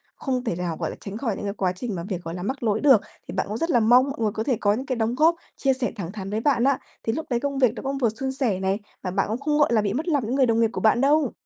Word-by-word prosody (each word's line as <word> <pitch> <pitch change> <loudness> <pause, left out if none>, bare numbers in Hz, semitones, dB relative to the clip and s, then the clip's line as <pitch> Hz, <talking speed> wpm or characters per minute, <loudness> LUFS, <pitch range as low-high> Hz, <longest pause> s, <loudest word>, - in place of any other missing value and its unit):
không 255 -3 -2
thể 205 -8 -1
nào, 175 -2 -3
gọi - - -2
là, - - -7
tránh 200 +1 -6
khỏi 230 -4 -2
những - - -6
cái 200 - -2
quá 190 -3 0
trình 215 +2 -4
mà 170 - -4
việc, 185 -1 -5
gọi 165 - -5
là, 180 - -5
mắc 265 +4 -3
lỗi 215 -2 +1
được, 270 -8 +6 0.3
thì - - -6
bạn 190 - -1
cũng 210 +2 -3
rất 330 +7 -1
là 245 - +4
mong 245 +4 +5
mọi 275 - -6
người 215 -2 +2
có 220 - -3
thể 255 -3 0
có 205 0 +3
những 255 +5 -3
cái 255 - -1
đóng 230 +1 0
góp, 320 +5 +4 0.2
chia 270 -1 +2
sẻ 255 -1 -2
thẳng 185 -4 -5
thắn 195 -2 -6
với 210 +2 -1
bạn 255 -2 +2
á. 275 0 +3 0.2
Thì 225 - 0
lúc 315 - -3
đấy 240 -2 +1
công 280 +1 -2
việc 255 -4 +4
nó - - -6
cũng 275 0 -2
vừa 240 -4 +2
suôn 265 +5 -4
sẻ 245 -8 -1
này, 190 +1 0 0.2
và 185 - -2
bạn 195 +1 0
cũng 225 +3 -2
không, 295 +1 0
gọi 285 -5 +4
là, 220 - +4
bị 200 -1 -1
mất 305 +8 -3
lòng 290 -7 +1
những 245 +5 -1
người 270 - +4
đồng 230 -1 +2
nghiệp 225 - +3
của - - -3
bạn 220 +2 +4
đâu! 285 -1 +3
235 Hz, 350 wpm, -24 LUFS, 205-270 Hz, 0.3 s, được